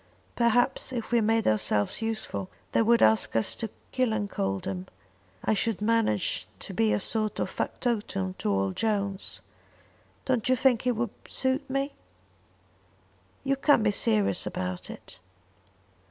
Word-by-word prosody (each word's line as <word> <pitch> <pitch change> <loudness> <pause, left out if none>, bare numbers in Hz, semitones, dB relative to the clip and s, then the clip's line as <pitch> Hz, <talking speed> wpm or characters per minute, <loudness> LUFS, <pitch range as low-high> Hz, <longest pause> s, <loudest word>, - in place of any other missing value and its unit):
Perhaps 245 +3 +2
if 235 -3 -4
we 235 -1 +4
made 225 +1 +2
ourselves 105 - +1
useful, 220 - -3 0.2
they - - +3
would 235 +1 +4
ask 110 +1 +3
us 115 - +1
to 225 - -3 0.2
Killancodlem. 100 - -1 0.6
I - - +3
should 220 -1 0
manage 210 - +1
to - - -7
be 110 -1 +2
a 105 - +2
sort 215 - 0
of - - -1
factotum 205 -6 -2
to - - -1
old 95 -1 0
Jones. 200 -3 -1 0.8
Don't 255 -2 +1
you 255 - +5
think 255 -1 +2
it 250 - +2
would 230 -1 -1 0.2
suit 260 0 -1
me?" 275 +1 -1 1.5
"You 275 0 +1
can't 275 -4 +4
be 210 - +3
serious 105 - +1
about 90 0 -4
it." - - -11
220 Hz, 140 wpm, -28 LUFS, -, 1.5 s, you